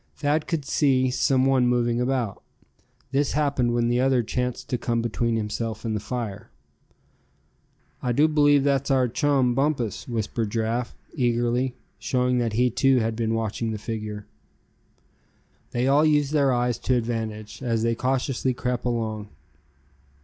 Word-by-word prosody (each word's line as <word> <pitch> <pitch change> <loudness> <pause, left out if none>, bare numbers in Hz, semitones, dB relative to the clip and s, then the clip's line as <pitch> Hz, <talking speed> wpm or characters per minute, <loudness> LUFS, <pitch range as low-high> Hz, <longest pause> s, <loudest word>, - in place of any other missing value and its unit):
Thad 150 +1 0
could 160 -5 -2
see 130 -3 +2
some 130 0 +2
one 130 -2 +3
moving 120 -1 +1
about. 125 -5 -1 0.7
This 140 0 +1
happened 140 -5 +1
when 120 -1 +2
the 120 +1 +1
other 130 -1 +3
chanced 125 +2 -3
to 125 - 0
come 115 -1 -1
between 115 0 -1
himself 110 +1 -3
and 110 -1 -1
the - - -1
fire. 115 -1 -5 1.5
"I 125 - -1
do 145 +6 +4
believe 145 -2 +4
that's 140 -1 +1
our 130 -2 +3
chum, 135 -1 +2
Bumpus;" 135 - -1
whispered 115 -1 -2
Giraffe, 115 +2 -2 0.2
eagerly, 120 +1 0 0.2
showing 125 +3 +1
that 115 -3 -1
he 125 +2 +2
too 135 +2 +3
had 115 -1 0
been 115 0 -1
watching 115 +1 -2
the 110 - -3
figure. 105 -1 -5 1.4
They 125 +2 0
all 140 +3 +4
used 150 -2 +2
their 140 -3 +3
eyes 120 -1 0
to 130 - +1
advantage, 110 -2 -3
as 115 -3 0
they 115 0 +2
cautiously 130 +1 -1
crept 125 -1 -2
along. 110 -3 -2
125 Hz, 150 wpm, -25 LUFS, 115-135 Hz, 1.5 s, do